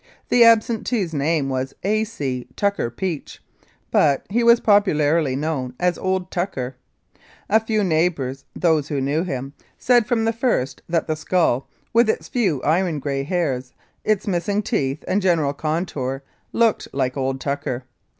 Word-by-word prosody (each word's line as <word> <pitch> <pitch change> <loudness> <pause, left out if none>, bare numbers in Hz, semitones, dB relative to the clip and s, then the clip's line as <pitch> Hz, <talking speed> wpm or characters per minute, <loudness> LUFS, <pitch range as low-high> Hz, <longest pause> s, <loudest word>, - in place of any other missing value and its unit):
The 245 - +6
absentee's 225 -4 +3
name 150 0 +1
was 130 0 -3
A. 215 +3 +2
C. 130 - -4
Tucker 200 -11 0
Peach, 160 +5 -5 0.5
but 140 -3 +3
he 235 +3 +2
was 235 0 +6
popularly 160 -8 +3
known 135 -4 -2
as 180 -1 +2
"Old 185 -1 -1
Tucker." 135 -9 -3 0.7
A 220 - +4
few 220 -1 0
neigh 170 -1 +3
bours, 135 -4 -6
those 160 -4 +2
who 145 -3 -2
knew 140 +4 0
him, 135 -6 -4 0.2
said 240 -3 +3
from 235 -2 +1
the 225 - +1
first 230 - -1
that 165 -1 +1
that 155 -1 -2
skull, 160 -8 +1 0.2
with 230 0 +4
its - - -1
few 190 - 0
iron 170 +1 +1
grey 140 -1 -2
hairs, 135 -5 -2 0.3
its 215 -2 +1
missing 200 +2 0
teeth 135 -4 -1
and 200 +2 +1
general 165 -7 +2
contour 145 -4 -3 0.3
"looked 230 -2 +2
like 130 -2 -1
old 135 -1 -1
Tucker." 140 -3 -3
160 Hz, 155 wpm, -22 LUFS, 135-205 Hz, 0.7 s, The